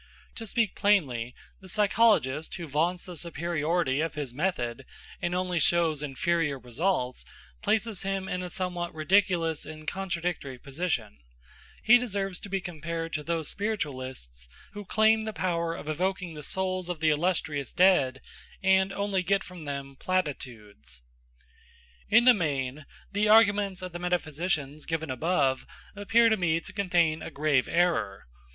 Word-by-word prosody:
To 225 - -7
speak 220 -1 +1
plainly, 135 - +1 0.2
the 190 - -12
psychologist 200 - +2
who 175 - -6
vaunts 165 +5 0
the 180 - -8
superiority 165 -2 -1
of 165 0 -2
his 145 -5 -4
method, 135 -6 -2 0.4
and 175 +1 -1
only 180 -1 0
shows 160 -2 +3
inferior 150 +1 0
results, 125 - -1 0.4
places 220 -2 0
himself 195 -1 -2
in 180 - -2
a 180 - -5
somewhat 175 -2 -3
ridiculous 165 -1 +2
and 155 0 -10
contradictory 175 -7 -3
position; 135 - -3 0.6
he 245 +2 +7
deserves 195 -6 -3
to 200 - -9
be 195 0 0
compared 165 -1 -5
to 155 - -1
those 160 0 -2
spiritualists 130 - -4 0.2
who 205 -1 -7
claim 220 +2 +3
the 220 - -4
power 170 -3 -1
of - - -9
evoking 180 +2 -2
the 150 - -8
souls 185 +3 -1
of 175 -3 -3
the 155 -1 +3
illustrious 150 -4 -1
dead 150 -8 +3 0.4
and 190 0 +4
only 200 -1 -1
get 195 +2 +1
from 180 -4 -10
them 140 -1 -5
platitudes. 120 - -4 1.1
In 225 +3 +6
the 250 0 +8
main 145 - -2 0.2
the 210 +1 +1
arguments 205 -4 +4
of 180 - -5
the 175 - -6
metaphysicians 155 -4 -2
given 160 -3 -2
above 135 -1 +1 0.3
appear 225 +3 +4
to 220 - +2
me 165 -3 +1
to - - -11
contain 175 -5 +1
a - - -6
grave 145 -3 +1
error. 165 - +1
170 Hz, 145 wpm, -28 LUFS, 145-190 Hz, 1.1 s, the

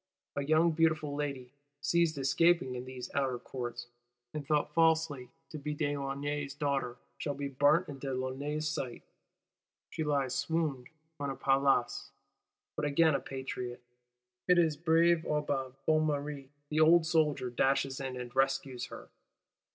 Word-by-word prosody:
A 140 - -1
young 160 +3 +4
beautiful 155 -2 +1
lady, 140 -3 -4 0.3
seized 160 +3 +2
escaping 140 +1 +3
in 125 0 -5
these 130 -1 -8
Outer 135 -3 0
Courts, 120 -1 -6 0.5
and 150 -1 -4
thought 150 0 0
falsely 160 -5 +2 0.2
to 155 - -6
be 150 +1 -3
de 145 -1 -1
Launay's 140 0 -3
daughter, 140 -4 -1 0.2
shall 145 -2 -2
be 140 0 -3
burnt 145 +6 +3
in 140 -2 -8
de 135 0 -4
Launay's 140 +4 -2
sight; 135 -6 -4 0.9
she 160 - -2
lies 140 -4 0
swooned 140 -2 -1 0.3
on 140 -1 -2
a 135 - -3
paillasse: 135 -2 +2 0.7
but 150 - -3
again 155 +2 +4
a 140 - +1
Patriot, 125 -2 -6 0.6
it 180 - +5
is 160 -3 +3
brave 165 +1 +3
Aubin 145 -4 -1
Bonnemere 150 -3 0 0.2
the 155 - 0
old 160 +1 +6
soldier, 155 -6 +1
dashes 135 +2 +1
in, 130 -2 -4
and 125 0 -7
rescues 135 -1 0
her. - - -10
140 Hz, 145 wpm, -32 LUFS, 135-155 Hz, 0.9 s, old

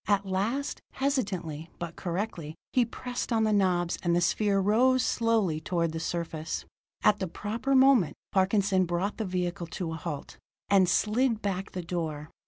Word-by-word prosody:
At 200 -1 +2
last, 210 +9 -1
hesitantly, 190 - -2
but 170 -1 -6
correctly, 175 -4 -4 0.2
he 250 -2 +4
pressed 245 +2 -5
on 225 -1 +3
the 215 -1 +2
knobs, 180 -4 +2
and 170 -1 +1
the - - +4
sphere 200 +3 +2
rose 245 +6 +3
slowly 220 -9 +1
toward 170 -1 0
the 160 - -4
surface. 165 -1 -3 0.4
At 210 0 +4
the 190 - -1
proper 225 +10 -2
moment, 260 - +5 0.2
Parkinson, 190 -1 +3
brought 175 +4 -1
the 220 - -2
vehicle 180 -2 -2
to 170 -1 -4
a - - -4
halt, 150 -3 -6 0.3
and 190 -3 +5
slid 220 +5 +2
back 195 0 -2
the 180 - -4
door. 160 -3 -4
190 Hz, 165 wpm, -28 LUFS, 170-220 Hz, 0.4 s, moment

